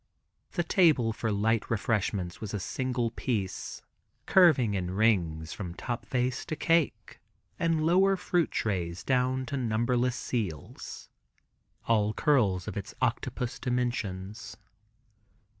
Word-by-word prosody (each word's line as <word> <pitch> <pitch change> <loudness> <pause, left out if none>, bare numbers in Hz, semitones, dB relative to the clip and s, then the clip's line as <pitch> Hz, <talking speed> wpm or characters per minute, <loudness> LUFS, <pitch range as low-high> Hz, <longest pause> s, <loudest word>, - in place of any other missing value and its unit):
The 175 - 0
table 155 - +3
for 110 0 -2
light 110 +2 +1
refreshments 100 -5 -1
was 105 -1 -4
a - - -2
single 125 +3 -1
piece, 110 -6 -3 0.4
curving 150 - +5
in 90 -2 -1
rings 90 -6 +1
from 90 -4 -6
top 120 +4 -4
vase 125 0 0
to 155 - -2
cake 165 -1 0 0.4
and 165 -2 +1
lower 190 +3 +4
fruit 175 -2 +1
trays 90 -5 -2
down 130 0 +1
to 140 - -3
numberless 120 +1 +1
seals, 95 - -4 0.8
all 110 -2 +3
curls 105 - +2
of - - -4
its 100 - -6
octopus 125 0 -1
dimensions. 115 -4 -3
115 Hz, 120 wpm, -29 LUFS, 100-130 Hz, 0.8 s, curving